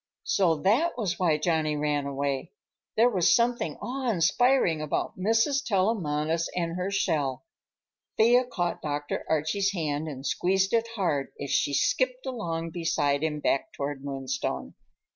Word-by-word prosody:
So 175 -5 +2
that 250 - +2
was 195 -7 -2
why 165 -5 +3
Johnny 155 -2 0
ran 145 -1 0
away. 140 -1 -3 0.4
There 240 +3 +5
was 185 -6 +4
something 235 -10 +1
awe 260 0 -2
inspiring 190 - +3
about 155 - -2
Mrs. 225 +8 +2
Tellamantez 165 - 0
and 170 -1 -1
her 180 +1 -2
shell. 150 -7 -1 0.7
Thea 240 +3 +5
caught 175 -8 -2
Dr. 145 -1 -3
Archie's 160 +6 +1
hand 155 -3 -2
and 135 -3 -7
squeezed 190 - +1
it 230 0 +2
hard 155 -9 -1
as 140 - -4
she 140 - +1
skipped - - +1
along 165 -10 -3
beside 145 -4 0
him 150 -2 -2
back 135 - 0
toward 140 -1 -4
Moonstone. 135 - -3
165 Hz, 145 wpm, -27 LUFS, 150-220 Hz, 0.7 s, There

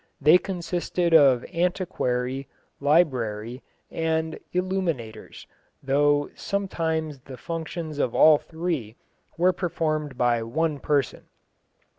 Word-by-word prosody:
They 155 +5 +6
consisted 175 -2 -2
of 135 -6 +6
antiquarii, 135 -7 -1 0.3
librarii, 125 -6 +1 0.3
and 160 0 -1
illuminators, 175 - -3 0.4
though 145 +1 +2
sometimes 160 -7 -2
the 130 0 -11
functions 160 +1 -5
of 125 - 0
all 155 -1 +7
three 160 -10 -4 0.4
were 180 +2 +3
performed 155 -6 -2
by 120 -2 +2
one 150 +6 -1
person. 140 -1 -1
155 Hz, 95 wpm, -25 LUFS, 130-170 Hz, 0.4 s, all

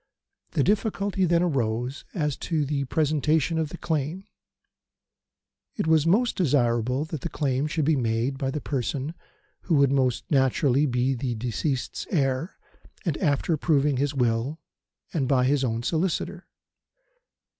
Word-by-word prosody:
The - - +2
difficulty 200 -2 +1
then 170 0 +3
arose 125 -4 -1
as 150 -5 0
to 155 -4 -1
the 140 -1 -1
presentation 155 +2 +1
of 160 -2 -1
the 175 - -8
claim. 160 +4 -2 1.5
It 205 - -1
was 160 -1 +3
most 235 +8 +3
desirable 125 - +1
that 155 -3 -6
the 170 - -3
claim 140 -1 0
should 155 -1 -1
be 160 +1 +3
made 120 +2 -1
by 135 - -1
the 150 +2 -3
person 140 +2 -2 0.5
who 170 - +2
would 140 -2 +4
most 130 -3 +1
naturally 135 +1 +3
be 125 +1 +1
the 125 -1 -2
deceased's 125 +4 -2
heir 135 0 0 0.5
and 165 -5 0
after 155 0 +1
proving 145 -3 +2
his 145 +2 0
will 125 +4 0 0.5
and 140 -6 0
by 130 -2 +3
his 140 +1 +2
own 115 -2 -1
solicitor. 165 +6 -1
145 Hz, 145 wpm, -26 LUFS, 130-160 Hz, 1.5 s, would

